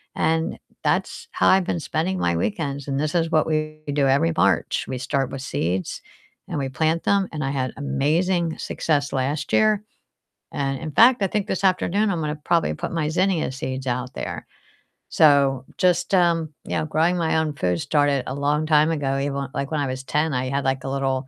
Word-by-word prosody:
And 160 0 0 0.3
that's - - -1
how 95 - +1
I've 190 -1 +5
been 170 - -1
spending 175 +5 -2
my 85 -1 +1
weekends, 145 - -2
and 135 0 -1
this 155 +2 -1
is 165 -1 +2
what 155 0 +3
we 155 0 -2
do 140 -2 +2
every 160 +5 +2
March. - - +2
We 130 - -4
start 135 0 -1
with 135 - -5
seeds, 90 - -2 0.5
and 145 - -3
we 135 - -1
plant 160 +5 0
them, 200 -1 +2
and 155 -1 -5
I 135 - -1
had 130 -2 -2
amazing 160 +5 0
success 145 -3 -1
last 140 +3 -2
year. 215 -1 +3 0.7
And 135 -1 -2
in 155 - -5
fact, 235 - +6
I - - +4
think 210 0 -1
this 190 - -2
afternoon 195 +3 +2
I'm 170 -3 -1
gonna 150 0 -2
probably 155 - 0
put - - -5
my 155 -3 -1
zinnia 180 -4 +1
seeds 130 0 -5
out 125 +1 -2
there. - - -5 0.6
So, 140 -4 +4
just, 180 +1 +1
um, 165 -3 +2
you - - -2
know, 155 - -1
growing 165 +3 +1
my 160 -1 +1
own 155 -2 0
food 90 -9 -1
started 145 -3 +1
a 130 - -3
long 145 +2 0
time 155 +1 +4
ago, 135 -3 -1
even, 140 0 -2
l 140 -1 -4
like, 140 - -3
when 155 - 0
I 140 - 0
was 130 +1 -4
10, 150 +2 0
I 130 +1 -1
had, 140 0 -1
like, 130 0 0
a - - -2
little 135 -1 -1
150 Hz, 205 wpm, -23 LUFS, 135-165 Hz, 0.7 s, fact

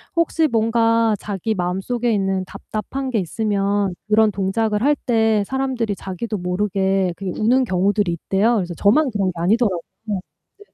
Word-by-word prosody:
혹시 330 -1 +2
뭔가 230 -2 +2
자기 205 +2 -3
마음속에 195 +7 -1
있는 195 -2 0
답답한 260 +8 -5
게 230 - 0
있으면 200 +1 0 0.2
그런 215 0 +4
동작을 210 +3 0
할 295 +2 +4
때 220 -3 +3
사람들이 260 -6 -1
자기도 200 +4 -5
모르게 190 0 0
그 195 - -7
우는 250 +5 +3
경우들이 195 0 +1
있대요. 195 +7 +1
그래서 180 -5 -2
저만 260 - +3
그런 200 -3 0
게 - - -4
아니더라고요. 190 0 +1 0.2
네네. 205 - -7
210 Hz, 345 characters per minute, -21 LUFS, 195-230 Hz, 0.2 s, 그런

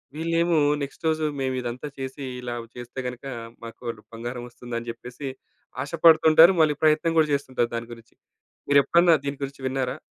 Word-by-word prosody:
వీళ్ళేమో 165 +1 +1 0.3
నెక్స్ట్ 140 +3 -8
రోజు 155 0 0
మేమిదంతా 130 0 -3
చేసి 135 +1 -6 0.2
ఇలా 120 -1 -4 0.2
చేస్తే 125 +1 -8
గనక 125 +2 -7 0.4
మాకు 115 +2 -11 0.3
బంగారం 120 +2 -6
ఒస్తుందని 120 -1 -7
జెప్పేసి 125 +4 -7 0.5
ఆశపడుతుంటారు. 160 +2 +6
మళ్ళీ 150 -2 +3
ప్రయత్నం 155 +2 +3
కూడా 155 -1 +3
చేస్తుంటారు 130 -4 -1
దాని 115 0 -5
గురించి. 115 -1 -16 0.5
మీరు 140 0 +7
ఎప్పుడన్నా 170 0 +5
దీని 140 0 -3
గురించి 135 0 -6
విన్నారా? 130 +1 -2
135 Hz, 140 wpm, -25 LUFS, 120-155 Hz, 0.5 s, మీరు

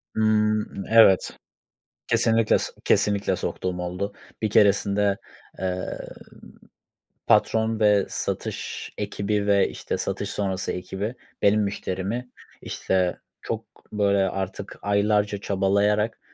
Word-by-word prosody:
Hımm, 110 -2 +1
evet, 110 -5 +6 0.8
kesinlikle 115 -1 +3
so - - -4
kesinlikle 100 -1 +2
soktuğum 90 -1 -3
oldu. 90 +3 -3 0.3
Bir 110 - +1
keresinde, 100 0 +3 0.4
ııı, 95 -1 -3 1.3
patron 110 0 +3
ve 105 -2 +4
satış - - -4
ekibi 100 0 -1
ve, 100 -1 +4
işte, - - -4
satış - - -3
sonrası 95 -2 -2
ekibi 95 +6 -4 0.3
benim 105 +1 +4
müşterimi, 100 +4 -3 0.3
işte, 90 -2 -1 0.2
çok, - - -4 0.3
böyle, 100 -2 +2
artık 95 +1 -5
aylarca 100 0 +1
çabalayarak 100 +3 +1
100 Hz, 100 wpm, -24 LUFS, 95-105 Hz, 1.3 s, evet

